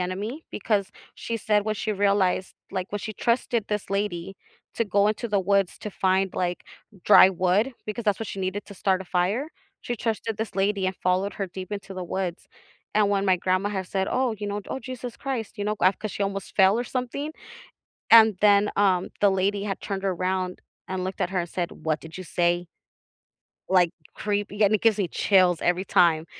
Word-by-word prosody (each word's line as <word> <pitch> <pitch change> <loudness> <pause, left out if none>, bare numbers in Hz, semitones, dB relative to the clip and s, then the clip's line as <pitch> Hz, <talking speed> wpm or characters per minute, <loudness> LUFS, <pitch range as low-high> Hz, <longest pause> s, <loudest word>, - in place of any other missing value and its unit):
enemy, 205 - -4
because 200 -1 -1 0.2
she 230 -1 -4
said 210 -1 +1
when 215 0 -1
she 215 +1 -2
realized, 200 -2 +1 0.2
like, 185 +1 -4
when 205 - -1
she 215 +1 -6
trusted 235 0 0
this 210 -1 -2
lady 195 -2 -2 0.4
to 230 - 0
go 200 +1 +3
into 225 +2 -2
the 205 -2 +2
woods 195 0 +1
to 210 - -6
find, 190 0 +1
like, 180 -1 -2 0.4
dry 195 -2 +8
wood- 185 +8 +1
because 215 +2 -4
that's 205 0 +1
what 225 - -3
she - - -6
needed 190 +2 -3
to 200 - -11
start 190 -1 +1
a - - -6
fire- 195 - 0 0.3
she 240 - -4
trusted 225 -1 -2
this 220 -3 -4
lady, 195 0 +1
and 185 - -1
followed 185 +2 0
her 195 - -3
deep 185 +2 -8
into 195 -1 -6
the 185 - -4
woods, 180 -1 -4 0.5
and 210 -1 +4
when 200 -1 +1
my 185 -2 +4
grandma 185 +3 0
had 190 -2 -3
said, 190 0 -1
"Oh, 255 -3 +1
you 205 - -4
know, 205 +1 -3
d - - -18
oh, - - -2
Jesus 255 -2 -7
Christ," 245 -5 -4
you 205 - -3
know, 210 +1 0
ga 185 - +4
'cause 215 0 -6
she 205 - -3
almost 195 -1 -4
fell 195 +2 +5
or 245 - -1
something, 260 +5 -3 0.8
and 220 -3 +8
then, 205 0 +5
um, 190 -3 +2
the 205 - +6
lady 195 +1 0
had 195 -2 -3
turned 195 -1 -4
around, 185 -1 -1 0.3
and 185 -1 -3
looked 185 +1 -4
at 175 - 0
her 185 -2 0
and 170 - -7
said, 175 -2 -3
"What 155 -1 +1
did 160 +1 -10
you 185 - -6
say?" 175 +1 0 1.0
like, 180 -3 +4 0.2
creepy, 205 0 -1
and 205 +1 +4
it 215 - +3
gives 225 -2 +4
me 190 -4 -1
chills 185 -4 +3
every 180 +2 +1
time, 160 -3 +3
200 Hz, 210 wpm, -25 LUFS, 185-210 Hz, 1.0 s, dry